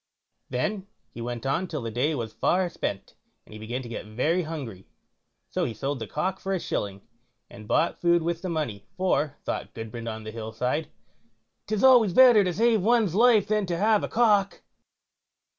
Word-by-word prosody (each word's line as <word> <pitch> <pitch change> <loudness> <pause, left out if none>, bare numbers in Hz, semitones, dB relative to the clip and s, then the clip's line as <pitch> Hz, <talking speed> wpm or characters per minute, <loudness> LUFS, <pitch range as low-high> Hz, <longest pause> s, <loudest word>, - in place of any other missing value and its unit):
Then 190 +10 -2 0.2
he 120 - -9
went 120 +1 -5
on 165 +7 0
till 150 -7 -5
the 115 - -4
day 145 +7 0
was 115 -4 -5
far 185 0 +1
spent, 100 - -5 0.3
and - - -15
he 110 - -9
began 120 +4 -4
to - - -8
get 115 -2 -7
very 150 +11 0
hungry, 135 - -7 0.6
so - - -1
he 115 - -3
sold 140 +2 -3
the 110 - -5
cock 180 - -2
for 195 - -3
a 190 - 0
shilling, 100 -9 -4 0.5
and 105 +1 -12
bought 165 +9 +1
food 170 -1 +3
with 170 0 -2
the 185 - -4
money, 135 - -3
for, 155 -6 0
thought - - -4
Gudbrand 115 +1 -6
on 110 0 -6
the 110 - -7
Hill 110 0 -7
side, 130 +7 -2 0.8
"'Tis 215 +1 -1
always 245 -8 +6
better 245 -2 +7
to 180 - 0
save 225 +3 +2
one's 220 -3 +2
life 225 -1 +5
than 210 -2 0
to 170 -1 -1
have 215 +2 +3
a - - -1
cock." 210 -4 +2
160 Hz, 190 wpm, -26 LUFS, 115-195 Hz, 0.8 s, better